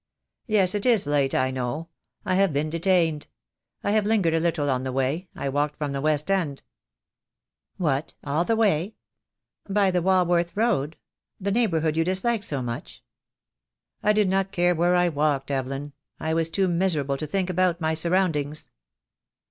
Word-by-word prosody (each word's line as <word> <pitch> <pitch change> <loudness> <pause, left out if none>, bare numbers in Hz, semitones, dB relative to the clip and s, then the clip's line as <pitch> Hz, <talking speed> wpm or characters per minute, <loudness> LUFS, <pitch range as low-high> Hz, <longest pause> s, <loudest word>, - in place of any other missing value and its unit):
"Yes, 200 -5 +3
it 205 -1 -2
is 230 -8 +3
late, 140 -2 +1
I 130 0 +1
know. 130 +6 -4 0.4
I 185 - 0
have 195 -1 +3
been 150 +2 -1
detained. 165 -3 +1 0.6
I - - 0
have 215 0 +3
lingered 200 -7 +2
a 165 - +2
little 160 -3 0
on 130 -2 0
the 130 - -3
way 135 +8 -1
— - - -40
I - - -4
walked 145 +2 -1
from 145 -2 -3
the 140 0 -3
West 155 +3 0
End." 165 -8 -1 1.1
"What, 150 -3 -1
all 150 +3 0
the 225 +5 +1
way? 205 -3 +1 0.7
By 195 -1 +3
the 180 -1 +1
Walworth 175 -1 +2
Road, 190 - 0 0.4
that 200 0 -1
low 235 - +2
neighbourhood 160 -8 +1
you 165 - +3
dislike 195 +5 0
so 140 -8 -2
much?" 120 -1 -7 1.0
"I 210 - +3
did 210 -1 +2
not 195 +1 0
care 175 -2 +2
where 175 +2 +2
I 180 0 +3
walked, 145 -3 0
Evelyn. 135 +2 -3 0.3
I 160 - -1
was 165 0 +1
too 190 +3 +1
miserable 170 -6 0
to 155 - -5
think 185 +3 -1
about 180 -1 +1
my 160 -1 0
surroundings." 160 -3 -1
165 Hz, 175 wpm, -25 LUFS, 145-190 Hz, 1.1 s, Yes